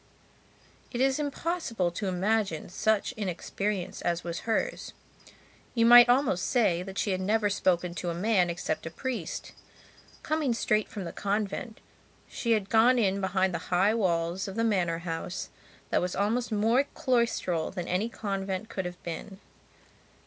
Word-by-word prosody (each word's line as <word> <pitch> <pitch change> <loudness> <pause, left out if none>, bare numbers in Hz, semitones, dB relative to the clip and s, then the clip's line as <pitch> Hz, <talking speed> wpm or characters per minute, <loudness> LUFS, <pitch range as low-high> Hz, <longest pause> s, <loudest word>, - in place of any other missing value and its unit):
It 240 - -4
is 270 +2 +2
impossible 285 - -1
to 195 +4 -4
imagine 190 -2 0
such 215 +4 +1
inexperience 200 -2 -3
as 170 0 -1
was 170 -1 -4
hers. 225 - -1 0.8
You 230 -1 +4
might 240 0 +9
almost 245 -8 +3
say 210 -9 +2
that 190 +1 -8
she 205 - 0
had 185 0 -1
never 210 +1 +1
spoken 180 -3 +1
to 175 0 -3
a 170 - -2
man 185 -1 +2
except 170 -1 -3
a - - -3
priest. 230 - -5 0.7
Coming 305 -6 0
straight 215 -2 +1
from 205 - -6
the 170 - -5
convent, 205 +3 -3 0.5
she 235 -2 0
had 210 -3 0
gone 235 +3 +5
in 200 -4 +1
behind 190 -1 +1
the 170 - -1
high 190 +4 +3
walls 175 -3 0
of 195 - -6
the 230 - 0
manor 180 -7 +1
house 165 +1 -4 0.4
that - - +3
was 180 0 -2
almost 225 +5 0
more 225 +6 +3
cloistral 235 -10 0
than 180 -2 -5
any 190 +6 0
convent 195 -1 -3
could 190 -4 -4
have 180 0 -7
been. 190 +3 -6
200 Hz, 155 wpm, -28 LUFS, 180-230 Hz, 0.8 s, might